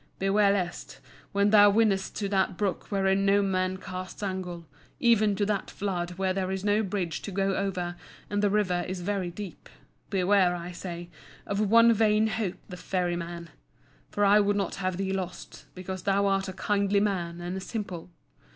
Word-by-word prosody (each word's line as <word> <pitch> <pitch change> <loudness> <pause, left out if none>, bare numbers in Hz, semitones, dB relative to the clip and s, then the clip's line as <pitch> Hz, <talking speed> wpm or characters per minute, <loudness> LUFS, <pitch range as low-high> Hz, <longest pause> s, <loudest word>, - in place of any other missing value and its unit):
Beware 200 +1 +3
lest, 180 -3 -3 0.3
when 200 0 +2
thou 205 -1 +8
winnest 200 -2 +2
to 205 - -2
that 190 -2 +1
brook 200 -3 -2
wherein 195 -1 +2
no 200 +1 +4
man 185 -1 0
casts 185 +1 -7
angle, 180 -3 -4 0.3
even 215 -3 +4
to 205 +1 0
that 205 -1 -1
flood 180 -3 -3
where 190 -1 0
there 185 -1 -2
is 190 0 -3
no 205 +1 +3
bridge 190 -5 -3
to 205 - -6
go 195 +1 0
over 180 -3 -2 0.3
and 205 0 -1
the 205 - +3
River 185 -4 +1
is 185 0 -4
very 190 -1 -2
deep—beware, 190 0 -1
I 175 0 -6
say, 175 -1 -7 0.3
of 200 0 -2
one 230 +1 +7
Vain 215 0 +3
Hope, 215 -4 -2
the 180 - -8
Ferryman! 175 -2 -3 0.6
For 205 - +1
I 205 +1 +6
would 205 0 +2
not 195 -3 -1
have 185 -1 -1
thee 195 0 -1
lost, 185 -2 -6
because 185 0 -6
thou 200 0 +2
art 195 -1 +1
a - - -5
kindly 200 +1 +1
man 175 -4 -1
and 175 +1 -4
a - - -3
simple. 185 -4 -5
195 Hz, 180 wpm, -28 LUFS, 180-205 Hz, 0.6 s, thou